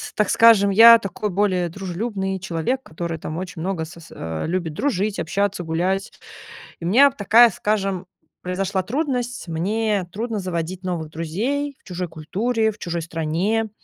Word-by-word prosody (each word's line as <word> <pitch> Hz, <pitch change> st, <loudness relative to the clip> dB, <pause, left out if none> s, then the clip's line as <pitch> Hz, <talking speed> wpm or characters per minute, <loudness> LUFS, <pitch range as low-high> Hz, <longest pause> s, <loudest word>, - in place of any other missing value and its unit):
так 210 Hz, -2 st, +1 dB
скажем, 225 Hz, -3 st, +6 dB
я 230 Hz, +3 st, +9 dB
такой 200 Hz, +1 st, -4 dB
более 185 Hz, -2 st, +1 dB
дружелюбный 190 Hz, +2 st, -3 dB
человек, 190 Hz, +9 st, -2 dB
который, 165 Hz, -2 st, -5 dB
там, 155 Hz, 0 st, -6 dB
очень 180 Hz, -2 st, -6 dB
много 175 Hz, -2 st, -2 dB
сос 170 Hz, 0 st, -13 dB
а, 80 Hz, -1 st, -5 dB
любит 170 Hz, -2 st, -2 dB
дружить, 210 Hz, -, -1 dB
общаться, 195 Hz, +2 st, -1 dB
гулять. 180 Hz, +5 st, -1 dB, 0.7 s
И -, -, -7 dB
меня 260 Hz, +11 st, +6 dB
б -, -, -20 dB
такая, 230 Hz, +4 st, +6 dB
скажем, 195 Hz, -2 st, -1 dB, 0.4 s
произошла 190 Hz, +1 st, -1 dB
трудность: 250 Hz, -, -2 dB
мне 200 Hz, +4 st, -1 dB
трудно 225 Hz, +2 st, -3 dB
заводить 185 Hz, 0 st, -4 dB
новых 170 Hz, -4 st, -3 dB
друзей 240 Hz, -, -2 dB
в -, -, -37 dB
чужой 180 Hz, -1 st, -4 dB
культуре, 220 Hz, +9 st, -1 dB
в 215 Hz, -, -12 dB
чужой 170 Hz, -1 st, -3 dB
стране, 170 Hz, +8 st, -1 dB
190 Hz, 150 wpm, -22 LUFS, 170-220 Hz, 0.7 s, я